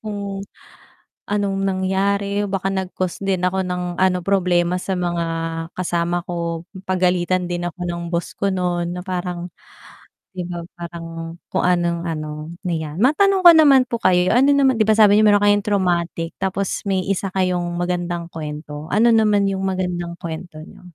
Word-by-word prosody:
kung 200 -2 -5 0.9
anong 200 -1 0
nangyari, 200 +1 0
baka 195 0 -1
nag 190 -1 -3
cost 185 +1 -3
din 190 -2 0
ako 190 +1 -1
ng 180 -1 -3
ano 185 -1 +3
problema 180 -3 +2
sa 190 - -2
mga 175 -1 -1 0.5
kasama 175 -1 -1
ko, 170 -1 -3 0.2
pagalitan 180 -1 +1
din 175 0 -3
ako 180 - -31
ng 170 0 -3
boss 170 0 -3
ko 200 0 0
nun 175 -2 -1
na - - -5
parang, 180 -1 -3 0.9
'di 185 - -4
ba? 175 -1 -5
Parang 165 -1 -7 0.2
kung 190 - +2
anong 175 -1 +1
ano 155 -1 -5 0.2
na 175 - 0
yan, 155 0 -5
matanong 380 - +3
ko 345 - +12
naman 285 -5 +6
po 235 -2 -3
kayo 180 +2 +3
ano 265 +3 +4
naman 275 -2 +4
'di - - +4
ba 220 - +4
sabi 210 -1 +6
n'yo 215 - +5
meron 205 0 +4
kayong 205 0 +4
traumatic 175 -4 0
tapos 190 0 -1
may 190 -1 0
isa 195 0 -1
kayong 180 -2 0
magandang 175 -1 -2
kwento, 150 -1 -7
ano 230 +3 +4
naman 210 -2 +3
yung 190 -1 -2
magandang 180 -2 -2
kwento 165 -1 -7
niyo? - - -15
180 Hz, 165 wpm, -21 LUFS, 175-200 Hz, 0.9 s, ko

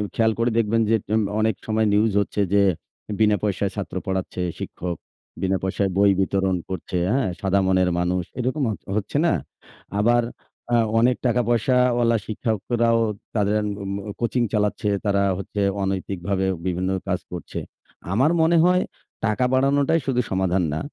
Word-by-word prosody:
খেয়াল 110 -1 +3
করে 120 +1 +2
দেখবেন 115 0 +2
যে, 115 - +4
জন 110 +1 +2 0.2
অনেক 110 -1 +2
সময় 110 0 +2
নিউজ 105 +1 +3
হচ্ছে 100 +1 -2
যে, 100 - +5 0.6
বিনা 105 -1 +4
পয়সায় 100 -1 0
ছাত্র 100 -2 -5
পড়াচ্ছে 95 -1 -2 0.2
শিক্ষক, 90 -2 -5 0.4
বিনা 95 0 +1
পয়সায় 95 +1 0
বই 100 0 +5
বিতরণ 95 0 +1
করছে, 95 -1 -4
হ্যাঁ, 130 -3 +1
সাদা 100 0 +2
মনের 95 -1 +3
মানুষ 90 +1 0 0.2
এরকম 130 +4 -1
হচ 105 - -6 0.2
হচ্ছে 105 +6 -2
না। 170 - +3 0.7
আবার 120 +3 +3 0.5
আ - - +5 0.2
অনেক 125 +2 +3
টাকা 125 0 +3
পয়সাওয়ালা 120 0 +3
শিক্ষকরাও 115 +1 0 0.4
তাদের 105 0 +2 0.2
উম 100 0 -4 0.3
কোচিং 120 +1 0
চালাচ্ছে, 105 0 0 0.2
তারা 100 -1 +2
হচ্ছে 100 +1 -4 0.2
অনৈতিকভাবে 95 0 -2 0.2
বিভিন্ন 90 0 -1 0.2
কাজ 90 -1 0
করছে। 90 -4 -6 0.5
আমার 135 +10 +3
মনে 165 +1 +4
হয় 180 +1 +4 0.4
টাকা 110 +3 +1
বাড়ানোটাই 140 +4 +3
শুধু 125 -2 +1
সমাধান 95 -1 +1
না। 75 - -1
105 Hz, 150 wpm, -23 LUFS, 95-120 Hz, 0.7 s, যে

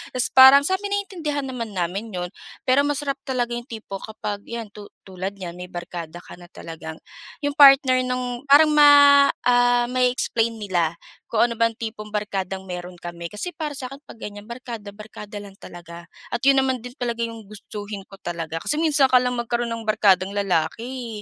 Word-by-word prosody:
Tapos 250 - 0
parang 265 +2 +9
sa'min 380 +4 -1
naiintindihan 345 -8 -3
naman 245 -4 -5
namin 185 +6 -2
'yon. 180 -1 -3 0.4
Pero 260 +2 +4
masarap 285 -1 -2
talaga 245 -2 -1
'yong 240 +1 -6
tipo 215 -4 -7
kapag 210 -1 -6
'yan 230 -3 -6
tu 205 -1 -11 0.2
tulad 190 +1 -6
niyan 180 -3 -7
may 180 0 -8
barkada 175 -1 -7
ka - - -12
na 175 -1 -14
talagang 160 -2 -9 0.5
'yong 290 - 0
partner 275 -3 +7
ng 250 +1 -4
parang 305 +2 +7
ma 285 -1 +7 0.2
ah, 245 0 +4
ma-e-explain 250 -2 0
nila 175 -6 -1 0.3
kung 230 - -3
ano 235 0 +1
bang 230 0 +2
tipong 220 -2 -6
barkadang 195 -2 -3
mayroon 180 -1 -7
kami. 170 0 -7
Kasi 210 - -5
para 305 -2 -4
sa'kin 275 +1 -8
'pag - - -11
ganyan 205 0 -9
barkada 235 -4 -7
barkada 210 0 -10
lang 200 -1 -12
talaga. 170 0 -11 0.3
At 240 - -2
'yon 275 +1 +4
naman 260 -2 -1
din 245 +1 -10
talaga 235 -1 -3
'yong 230 -2 -9
gustuhin 210 -1 -8
ko 195 - -13
talaga 165 -2 -4
kasi - - +1
minsan 300 -4 +4
ka 250 -1 +6
lang 250 0 -1
magkaroon 240 0 -2
ng 230 -1 -5
barkadang 195 -3 +3
lalaki, 210 +5 -2
230 Hz, 180 wpm, -23 LUFS, 195-260 Hz, 0.5 s, parang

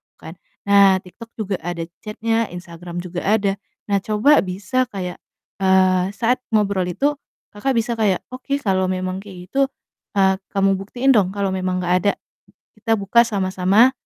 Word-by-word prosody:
kan. - - -10 0.3
Nah, 200 -1 +6
TikTok 185 +6 -12
juga 200 -4 -2
ada 170 0 -4 0.2
chat-nya, 225 +1 -1
Instagram 175 0 -7
juga 175 0 -5
ada. 200 -2 +1 0.4
Nah, 200 - +3
coba 215 +9 +4
bisa 200 +7 -1
kayak, 185 -6 -6 0.4
eee, 185 -1 +4
saat 245 +2 +1 0.2
ngobrol 200 -3 +1
itu 285 - 0 0.3
Kakak 245 +5 -1
bisa 230 0 -1
kayak, 200 -4 +1
"Oke, 265 +2 -3
kalau 190 -2 +1
memang 185 0 -2
kayak 185 -2 -11
gitu, 275 0 +2 0.5
eee, 190 -1 +3 0.2
kamu 195 -1 +2
buktiin 245 +7 +1
dong 200 -4 +2
kalau 200 -1 0
memang 185 -1 -1
nggak 180 +1 +1
ada, - - +4 0.7
kita 225 -2 +1
buka 225 +4 +3
sama-sama 195 +3 +3
195 Hz, 155 wpm, -21 LUFS, 185-225 Hz, 0.7 s, Nah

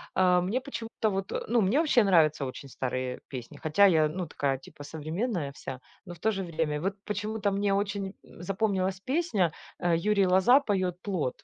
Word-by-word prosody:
а 180 -1 +4
мне 215 +8 -1
почему-то 230 -5 -3
вот, 195 -1 -3 0.2
ну, 235 -1 +3
мне 210 +10 +3
вообще 290 -8 +4
нравятся 155 -7 +4
очень 135 +1 -7
старые 130 0 -3
песни, 125 -4 -8
хотя 160 +6 +4
я, 160 -5 +5
ну, 175 +3 -4
такая 140 -2 -1
типа 135 +2 -13
современная 160 - -3
вся, 130 -2 -7 0.3
но 175 - -8
в 170 - -15
то 220 +6 +2
же 195 -2 -3
время 155 -3 -2
вот 195 +2 -1
почему-то 210 0 -2
мне 200 0 +1
очень, 200 -1 -2
м, - - -14
запомнилась 190 -1 -1
песня, 255 - +1 0.3
а, 175 -1 +1
Юрий 200 +4 +3
Лоза 190 +10 +5
поет 185 -6 -1
"Плот". 175 -11 -3
185 Hz, 185 wpm, -28 LUFS, 155-205 Hz, 0.3 s, я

